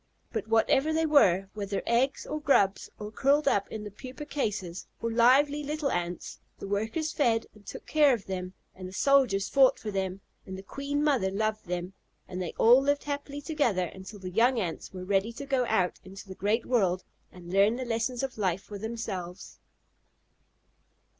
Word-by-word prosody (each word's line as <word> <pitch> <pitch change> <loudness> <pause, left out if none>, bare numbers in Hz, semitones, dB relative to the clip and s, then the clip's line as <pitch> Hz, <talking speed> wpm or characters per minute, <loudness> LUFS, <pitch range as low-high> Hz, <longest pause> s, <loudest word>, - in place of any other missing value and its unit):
But - - -3
whatever 245 +7 +3
they 320 +1 +1
were, 195 - +4
whether 200 -1 -3
eggs, 250 +4 +1
or 305 - -4
grubs, 200 -9 +2
or 210 0 -7
curled 280 +6 +2
up 200 -6 +2
in 215 -1 -5
the 210 - -7
pupa 255 +7 -9
cases, 205 - -3
or 230 - -2
lively 270 +6 +4
little 295 -1 -2
Ants, 175 0 -4 0.2
the - - -7
workers 220 +11 -1
fed 230 -6 +2
and 210 -1 -20
took - - -8
care 300 -2 +4
of 230 -6 -1
them, 185 -1 -5 0.2
and 185 -1 -8
the 185 - -10
soldiers 250 -5 +3
fought 270 -2 +5
for 215 - -5
them, 190 -1 -3 0.2
and 190 0 -8
the 190 - -9
queen 280 +7 -3
mother 265 -11 +2
loved 215 +1 -2
them, 180 +1 -4 0.3
and 180 0 -5
they 175 - -5
all 245 +4 +7
lived 285 +1 +1
happily 285 0 -5
together 280 - 0
until 190 +2 -10
the 185 -2 -7
young 235 +5 +3
Ants 175 -6 -4
were 185 -1 -7
ready 200 +3 +1
to 280 - -7
go 265 -3 +1
out 185 -5 +1
into 190 +2 -11
the 190 - -7
great 210 +5 0
world 190 -7 +1 0.3
and 175 0 -10
learn 200 +4 +4
the 255 +1 -4
lessons 235 +2 -1
of 265 -4 -4
life 190 -2 0
for 205 -1 -8
themselves. 195 -5 -6
220 Hz, 185 wpm, -28 LUFS, 190-270 Hz, 0.3 s, all